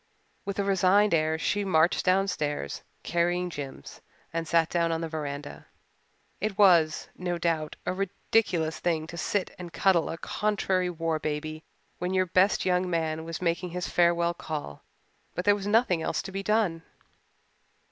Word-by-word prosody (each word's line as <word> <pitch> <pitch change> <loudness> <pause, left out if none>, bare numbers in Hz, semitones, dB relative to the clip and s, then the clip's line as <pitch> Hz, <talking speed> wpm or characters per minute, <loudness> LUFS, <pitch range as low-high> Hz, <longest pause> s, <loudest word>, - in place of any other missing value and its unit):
With 200 - -4
a 200 - +1
resigned 195 +1 +3
air 160 0 +2
she 205 +5 0
marched 170 -3 +3
downstairs, 180 - 0 0.2
carrying 175 +1 0
Jims, 140 -4 -8 0.3
and 165 0 -2
sat 165 -1 +3
down 170 0 +1
on 165 0 -1
the 165 - -2
veranda. 145 -2 -6 0.7
It 205 -1 -2
was, 170 -6 +5
no 175 -1 -2
doubt, 160 -3 -1
a - - 0
ridiculous 185 -3 0
thing 160 -3 0
to 165 - -9
sit 190 +2 -1
and 175 -1 -7
cuddle 180 -2 +2
a 165 - -4
contrary 190 -2 0
war 165 -2 -1
baby 155 +1 -4 0.4
when 180 +2 -1
your 185 0 +3
best 185 +3 +3
young 180 0 +1
man 160 -2 -1
was 165 +2 -5
making 170 +1 0
his 180 +1 -4
farewell 170 0 +3
call, 150 - -6 0.5
but 180 - -3
there 205 - +6
was 200 -1 -4
nothing 205 -6 +3
else - - -1
to - - -7
be 195 +1 -3
done. 200 -5 +1
175 Hz, 160 wpm, -28 LUFS, 160-190 Hz, 0.7 s, there